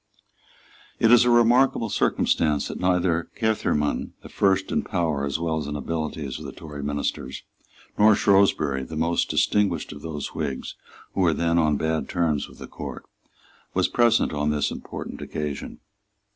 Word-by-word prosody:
It 115 - +4
is 120 0 +7
a - - +3
remarkable 120 0 +4
circumstance 75 -6 +1
that - - -6
neither 90 -2 +1
Caermarthen, 110 -10 0
the - - -10
first 95 -1 +1
in - - +1
power 80 -6 -1
as 70 - -1
well 80 -1 -1
as 75 - -5
in 75 - -4
abilities 80 -2 -4
of - - -9
the - - -6
Tory 75 -2 -9
ministers, 70 -2 -3 0.6
nor 105 0 +7
Shrewsbury, 95 -10 +3
the 80 - -8
most 85 +2 +1
distinguished 100 -6 +1
of 75 -1 -9
those 80 -2 -5
Whigs 70 -5 -4 0.4
who 95 - 0
were 85 -3 +4
then 85 +1 +1
on 75 -3 +2
bad 80 -2 -1
terms 80 -5 0
with - - -16
the - - -8
Court, - - -7 0.7
was - - +3
present 120 -7 +3
on 75 0 0
this 75 -1 0
important - - -7
occasion. 75 -2 -5
80 Hz, 160 wpm, -24 LUFS, 75-95 Hz, 0.7 s, is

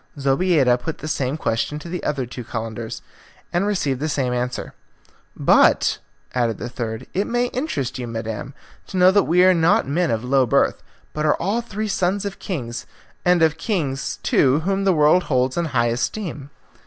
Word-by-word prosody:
Zobeida 135 -2 +3
put 160 +5 -5
the 155 - -7
same 140 -2 -1
question 115 +2 -1
to 150 - -9
the 180 +1 -5
other 140 -4 -1
two 125 +1 -8
Calenders, 115 0 -5 0.5
and 180 +4 +1
received 145 -11 0
the 155 +2 -2
same 130 -4 0
answer. 125 0 -3 0.6
"But," - - +4 0.3
added 120 -3 0
the 120 - -5
third, 115 0 -5
"it 195 +3 0
may 245 +1 0
interest 145 - -3
you, 125 - -4
madam, 115 +3 -5 0.3
to 190 - -5
know 185 +1 +6
that 200 0 +3
we 180 +2 +4
are 185 0 +6
not 165 -5 +3
men 165 +4 +1
of 115 0 -1
low 130 0 +2
birth, - - +2 0.3
but 150 - -2
are 150 - +4
all 205 +7 -1
three 215 -2 -4
sons 195 0 0
of 200 -1 -5
kings, 120 - -5 0.4
and 180 -2 +4
of 160 0 +2
kings, 150 - -2
too, 140 +3 +3
whom 195 +3 -1
the 190 - +4
world 155 +3 +4
holds 130 -2 +1
in 170 - 0
high 120 -6 +1
esteem." 145 - -3
150 Hz, 185 wpm, -22 LUFS, 125-180 Hz, 0.6 s, know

